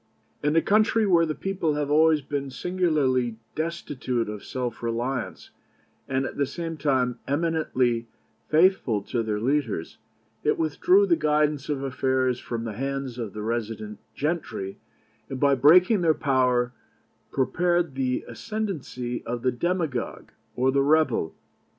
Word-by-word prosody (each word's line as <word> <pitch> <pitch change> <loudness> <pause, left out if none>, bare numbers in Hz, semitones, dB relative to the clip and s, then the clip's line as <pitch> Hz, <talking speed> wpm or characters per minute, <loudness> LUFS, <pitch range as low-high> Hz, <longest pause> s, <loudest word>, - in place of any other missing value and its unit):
In 150 +1 +1
a 165 - +4
country 215 +1 +3
where 170 -4 +4
the 155 - -2
people 185 -6 -1
have 145 -1 -1
always 155 0 +5
been 140 0 -3
singularly 135 -7 0 0.2
destitute 145 -8 -2
of 105 -1 -6
self 125 -2 -4
reliance, 120 +2 -3 0.6
and 130 0 0
at - - -6
the 140 - +1
same 165 +1 -5
time 130 -4 0
eminently 140 -6 0 0.4
faithful 155 - +3
to 120 +3 -2
their 110 -2 -2
leaders, 120 - -1 0.4
it - - +2
withdrew 345 - +3
the 355 -4 +4
guidance 150 - +1
of 140 -2 -1
affairs 130 -1 0
from 115 -1 -4
the 115 -2 -4
hands 135 +1 -4
of 110 -4 -4
the 105 - -5
resident 110 -2 -3 0.2
gentry, 150 - -3 0.5
and, 135 - -5
by 140 0 +4
breaking 180 - +6
their 160 -2 +3
power, 125 -3 +2 0.6
prepared 175 +3 +1
the 130 -1 -1
ascendency 160 - -4
of 120 0 -3
the 130 - +3
demagogue 160 -2 -2 0.2
or 130 +2 +2
the 140 +1 +2
rebel. 140 - +2
135 Hz, 140 wpm, -25 LUFS, 120-160 Hz, 0.6 s, breaking